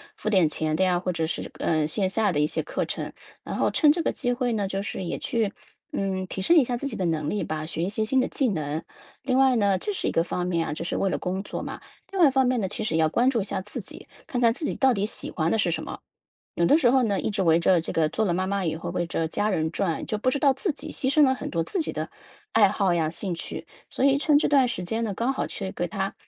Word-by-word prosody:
付 - - -8
点 185 -7 +4
钱 155 0 -1
的 190 - +2
呀， 180 -1 +2
或 180 0 -2
者 165 -1 -1
是， - - -4
呃， 155 -2 +1
线 185 +4 0
下 210 -1 +1
的 150 - 0
一 150 - +3
些 - - -1
课 - - -2
程。 - - -5 0.3
然 - - -5
后 - - +2
趁 300 -2 +5
这 335 - 0
个 - - 0
机 245 -2 -1
会 245 -1 -1
呢， 205 -3 -1
就 195 0 -2
是 190 - -4
也 170 - -3
去， 225 -4 -1 0.4
嗯， 190 -1 -1
提 190 - -4
升 335 - +4
一 295 - +7
下 245 0 -2
自 280 - -4
己 - - -4
的 185 - -1
能 155 -2 -1
力 210 - -1
吧， 155 0 -3
学 165 0 -3
一 185 - 0
些 215 +2 -1
新 260 +4 +2
的 - - +2
技 265 -4 0
能。 155 -3 -2 0.4
另 260 -1 0
外 265 -2 +5
呢 200 -3 +3
这 415 - -3
是 - - -2
一 - - +1
个 165 - +2
方 180 0 -2
面 170 -2 0
啊， - - -2
这 - - -5
是 - - -2
为 195 -2 +1
了 - - 0
工 190 +2 -3
作 - - -5
嘛。 - - -6 0.3
另 390 - -3
外 320 - +8
一 275 - +3
方 265 -1 +3
面 250 -2 +1
呢， 190 - 0
其 215 - -3
实 160 - -1
要 160 -1 +3
关 245 +9 +3
注 235 -5 +1
一 - - -1
下 195 -1 -3
自 210 - -7
己， - - -11 0.2
看 250 - -3
看 230 -1 +5
自 275 - -9
己 - - -1
到 265 -2 +4
底 200 -1 0
喜 - - -3
欢 165 0 -1
的 225 - +1
是 180 - +2
什 160 -1 -2
么？ - - -7 0.6
有 170 - +1
的 300 - +5
时 250 - +4
候 260 0 +4
呢， 205 -5 +1
一 - - -1
直 200 -2 -1
围 165 -1 +4
着 175 0 +4
这 - - -4
个 155 -2 +2
做 220 - 0
了 180 - +1
妈 185 +1 0
妈 200 0 -1
以 160 -2 -1
后， 165 - -5
围 175 - -1
着 165 -1 -1
家 205 +5 0
人 160 -4 0
转， 175 -5 -1
就 215 - -1
不 255 +4 +1
知 285 - -1
道 275 0 +4
自 315 +4 -1
己 - - -8
牺 265 - 0
牲 305 - +5
了 265 -1 +3
很 - - -6
多 165 -1 0
自 365 - -2
己 - - -2
的 - - -4 0.4
爱 210 -3 +6
好 190 -3 +1
呀、 160 -2 +1
兴 180 +1 -3
趣， - - -7 0.2
所 265 - -1
以 275 0 +4
趁 295 0 +4
这 - - +1
段 275 -3 +5
时 185 -6 -3
间 225 +6 -2
呢， 205 - -2
刚 240 +7 0
好 - - -2
去 - - -5
给 - - -2
它 - - -3
200 Hz, 330 characters per minute, -25 LUFS, 170-255 Hz, 0.6 s, 外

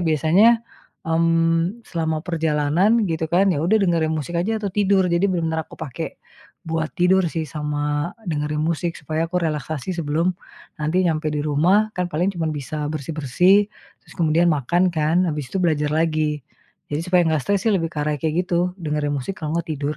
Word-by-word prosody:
biasanya, 160 - +4 0.6
mhm, 165 +4 +2
selama 160 -2 -1
perjalanan, 165 +5 +1
gitu 160 -1 -1
kan, 190 +3 +4
ya 175 -6 +1
udah 205 +6 +3
dengerin 165 -4 +1
musik 160 +2 -3
aja 215 +6 0
atau 205 - -2
tidur, 195 -1 +2
jadi 170 +2 +1
bener-bener 160 -3 -1
aku - - -28
pake 160 +1 -6 0.5
buat 160 -1 -1
tidur 185 +1 +3
sih, 165 -1 -2
sama 150 +2 -2 0.2
dengerin 150 0 -1
musik 170 +1 -1
supaya 155 +2 -2
aku 180 - +1
relaksasi 155 0 -3
sebelum 165 +3 0 0.5
nanti 155 +5 +1
nyampe 155 -1 0
di 150 - -1
rumah, 175 +9 +3
kan 180 0 0
paling 175 +5 +1
cuman 160 -2 -1
bisa 150 +1 -4
bersih-bersih, 160 +7 +2 0.4
terus - - -17
kemudian 165 +1 +3
makan 175 +6 +1
kan, 160 +3 +2
habis 150 -4 -4
itu 195 - -1
belajar 150 -3 +1
lagi. 155 -2 0 0.5
Jadi 145 - 0
supaya 180 0 +3
nggak 155 -2 +1
stres 200 -1 +1
sih, 225 - +3
lebih 165 -3 0
ke 155 - -6
arah 150 0 0
kayak 160 +3 0
gitu, 175 0 0
dengerin 150 -2 -1
musik, 140 +8 -4
kalo 155 +1 -2
nggak 170 - -4
tidur. 145 0 -3
160 Hz, 175 wpm, -22 LUFS, 150-180 Hz, 0.6 s, biasanya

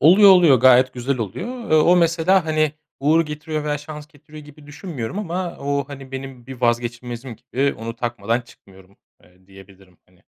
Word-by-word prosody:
Oluyor 190 +7 +7
oluyor, 175 -8 +6
gayet 130 0 +5
güzel 125 +2 -2
oluyor. 185 - -6
Eee, 155 - +5
o 175 +3 +5
mesela, 170 +2 +3
hani, 155 -1 +1 0.3
uğur 155 +4 +3
getiriyor 150 0 -5
veya 150 -1 -1
şans 150 0 -9
getiriyor 150 0 -14
gibi 150 0 -16
düşünmüyorum. 145 - -6
Ama 180 -3 -4
o, 140 0 -2
hani, 135 -2 -10
benim 130 -2 -8
bir 130 -2 -10
vazgeçilmezim 120 0 -2
gibi 140 +2 -1
onu 115 +1 -6
takmadan 120 -1 -2
çıkmıyorum, 95 -5 -20 0.3
eee, 90 +1 -26
diyebilirim, 95 -2 -18
hani. 90 -1 -29
140 Hz, 170 wpm, -21 LUFS, 120-155 Hz, 0.3 s, Oluyor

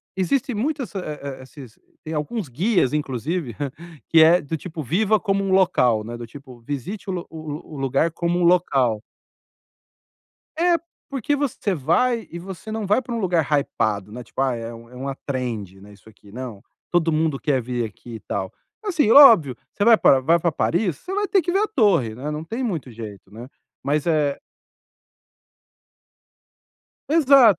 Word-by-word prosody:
existem 235 +7 0
muitas 265 +1 -2
esses, 190 - -3
eh 150 -1 -6
eh, 140 -2 -7
esses 130 -3 -13 0.2
tem 160 -1 -6
alguns 160 +6 -3
guias, 170 - +1
inclusive, 145 - -2 0.5
que 165 - +6
é 170 +3 +6
do 145 +3 -4
tipo 160 0 -6
viva 200 - +2
como 195 -2 0
um 195 - -1
local 150 - +3
né, 120 +1 -6
do 120 0 -7
tipo 130 0 -13
visite 145 - -6
o - - -1
lu 175 -2 -5
o 160 -1 -9
lu 150 - -5
o - - -7
lugar 135 +4 +1
como 170 +2 -1
um - - +1
local. 135 -11 +2 1.6
É, 345 +1 +3 0.3
porque 275 +1 -1
você 260 -8 -1
vai 225 - +1
e 170 - -7
você 190 +4 -8
não 220 -1 -3
vai 210 +6 +3
para 240 -1 -5
um - - -2
lugar 175 -4 +2
hypado, 105 -8 0
né, 125 +2 -7
tipo, 120 - -7
ah, 135 -2 +2
é 115 0 -6
um 115 0 -13
é - - -15
uma 135 +2 -4
trend, 115 -8 -4
né, 105 +1 -14
isso 100 +1 -18
aqui, 105 -1 -18
não, 120 -4 -7 0.3
todo 170 -2 +2
mundo 155 -2 +1
quer 140 -4 +1
vir 120 0 -2
aqui 115 +2 -9
e - - -11
tal. 95 -1 -4 0.3
Assim, 335 - +1
óbvio, 225 - +8 0.2
você 205 - -1
vai 230 0 +7
para 135 - +5
vai 165 +6 +3
para 170 0 0
Paris, 175 0 0
você 370 - -8
vai 410 +1 0
ter 390 -2 +2
que 350 - -2
ver 390 - +2
a 425 - +1
torre, 200 - +2
né, 135 +6 -5
não 150 +1 -4
tem 230 +10 -4
muito 170 - -3
jeito, 105 -4 -10
né. 115 +4 -9 0.3
Mas, 145 +2 0
eh 150 -4 +1 2.7
Exato, 275 - +6
155 Hz, 185 wpm, -22 LUFS, 125-205 Hz, 2.7 s, óbvio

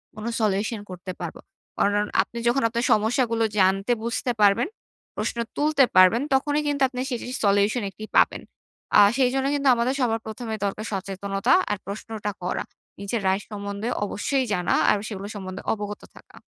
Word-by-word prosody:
কোনো 215 +2 -4
solution 210 +2 0
করতে 185 0 -7
পারব। - - -5 0.4
কারণ 205 +1 +2 0.2
আপনি 235 - -7
যখন 250 +3 +3
আপনার 235 +1 -1
সমস্যাগুলো 230 +1 +1 0.2
জানতে, 195 +4 +3
বুঝতে 235 +2 -1
পারবেন, 205 +6 +4 0.5
প্রশ্ন 220 +2 -3 0.2
তুলতে 295 -2 +3
পারবেন, 185 +6 +6
তখনই 290 +2 +2
কিন্তু 285 -1 -1
আপনি 250 -1 -7
সেটির 250 0 -4
solution 205 +4 +3
একটি 215 +2 -9
পাবেন। - - +4 0.6
আ - - +8 0.2
সেইজন্য 265 0 +2
কিন্তু 280 -1 0
আমাদের 240 +2 +1
সবার 225 -2 +1
প্রথমে 220 +1 -5
দরকার 200 +2 -3
সচেতনতা 195 0 -1 0.2
আর 205 - 0
প্রশ্নটা 210 +1 -5
করা। 180 - -2 0.4
নিজের 205 +3 -2
right 190 +2 +1
সম্বন্ধে 200 +1 -5 0.2
অবশ্যই 260 +6 -1
জানা, 180 -2 0 0.2
আর - - +5
সেগুলো 200 -2 -6
সম্বন্ধে 190 -1 -6
অবগত 210 -1 -5
থাকা। - - -17
215 Hz, 155 wpm, -24 LUFS, 200-245 Hz, 0.6 s, আ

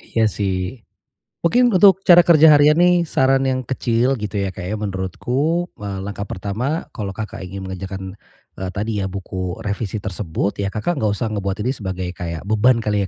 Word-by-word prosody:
Iya 115 -1 -1
sih, 95 +3 -3 0.6
mungkin 240 +7 +3
untuk 190 0 +5
cara 175 -1 +8
kerja 160 -2 +7
harian 150 +1 +5
nih 175 0 +4
saran 135 0 +2
yang 130 0 0
kecil 125 0 +1
gitu 105 -1 -4
ya, 95 - -3
Kak, 90 - -7
ya, 110 - -2
menurutku, 120 - -1
mmm, 100 -2 -5
langkah 100 0 -5
pertama 115 - -3
kalau 100 -2 -4
Kakak 110 -1 -6
ingin 95 +1 -7
mengerjakan, 95 0 -6 0.5
eee, 95 -1 -3
tadi 105 +1 -2
ya 95 - -2
buku 95 -1 -5
revisi 105 0 -3
tersebut 100 0 -3
ya 100 - 0
Kakak 140 - -2
nggak 105 -1 +1
usah 115 -3 -3
ngebuat 100 -2 -2
ini 130 - +1
sebagai 95 -4 -4
kayak 85 -1 -5
beban 115 +3 +3
kali 105 -1 +1
105 Hz, 180 wpm, -20 LUFS, 95-135 Hz, 0.6 s, cara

